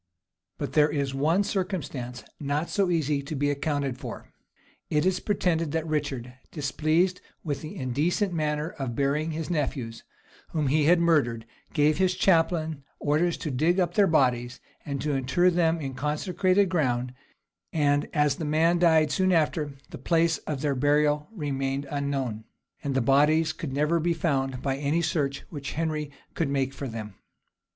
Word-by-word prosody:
But - - -4
there 150 0 +5
is 140 -2 -1
one 160 +8 +2
circumstance 160 -11 -3 0.2
not 145 +3 -2
so 195 -3 +1
easy 150 -4 +1
to 140 +3 -6
be 145 +1 +1
accounted 140 -2 -2
for: - - -8 0.6
it 150 +2 +1
is 185 -1 +2
pretended 165 -7 0
that 160 -1 -1
Richard, 140 -6 -2 0.2
displeased 160 +5 +1 0.2
with 145 -4 -3
the 155 - -7
indecent 155 - 0
manner 150 -1 -1
of 125 -4 -3
burying 140 +4 0
his 160 +2 -4
nephews, 135 -7 -2 0.5
whom 150 -4 +1
he 150 +1 +3
had 170 +2 +5
murdered, 140 -10 +2 0.3
gave 150 +1 +2
his 185 -1 +2
chaplain 165 -5 +2 0.2
orders 160 +4 +1
to 155 - -4
dig 160 +8 +2
up 175 -2 +1
the 200 0 +4
bodies, 125 -6 +1 0.2
and 140 -2 -4
to 150 - 0
inter 135 +7 +2
them 170 -1 +2
in 135 -3 -4
consecrated 180 +8 +1
ground; 125 -8 0 0.6
and 145 -2 +1
as 150 -3 +2
the 170 - -4
man 160 +3 +2
died 160 -3 +4
soon 185 +2 +2
after, 155 -3 +1 0.2
the - - -8
place 165 -1 +2
of 145 -3 -3
their 145 -2 +1
burial 150 +2 +2
remained 140 -6 -2
unknown, 135 -6 -2 0.4
and 140 -2 -2
the 135 - +3
bodies 150 +5 +3
could 155 - -6
never 150 +5 +1
be 170 +1 +1
found 135 -5 -1
by 135 -1 0
any 145 +4 0
search 145 -4 -1
which 140 -3 -5
Henry 155 -2 -2 0.2
could 160 -4 -1
make 135 -1 0
for 140 0 -5
them. 110 -3 -6
150 Hz, 165 wpm, -27 LUFS, 140-165 Hz, 0.6 s, there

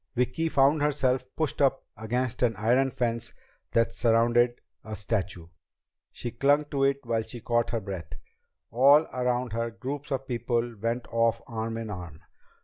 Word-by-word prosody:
Vicki 125 +7 0
found 140 +1 +4
herself 135 -3 +1
pushed 155 -2 -1
up 135 -1 +2
against 120 +3 -2
an 120 -3 +2
iron 120 +6 +2
fence 115 -2 -2 0.4
that 115 0 +2
surrounded 120 +1 +3 0.2
a 110 0 -6
statue. 95 -5 -2 0.7
She 120 - -5
clung 145 +5 +3
to 140 -2 +1
it 140 0 +2
while 115 -1 0
she 120 +2 -7
caught 120 +1 0
her 115 - -1
breath. 95 -4 -6 0.6
All 140 +6 +6
around 125 -2 -1
her, 115 0 -1
groups 135 +5 -6
of 135 0 -2
people 120 -1 -1
went 115 +2 -1
off 115 0 +1
arm 115 0 -4
in 115 -2 -5
arm. 85 -5 -8
120 Hz, 155 wpm, -27 LUFS, 115-130 Hz, 0.7 s, All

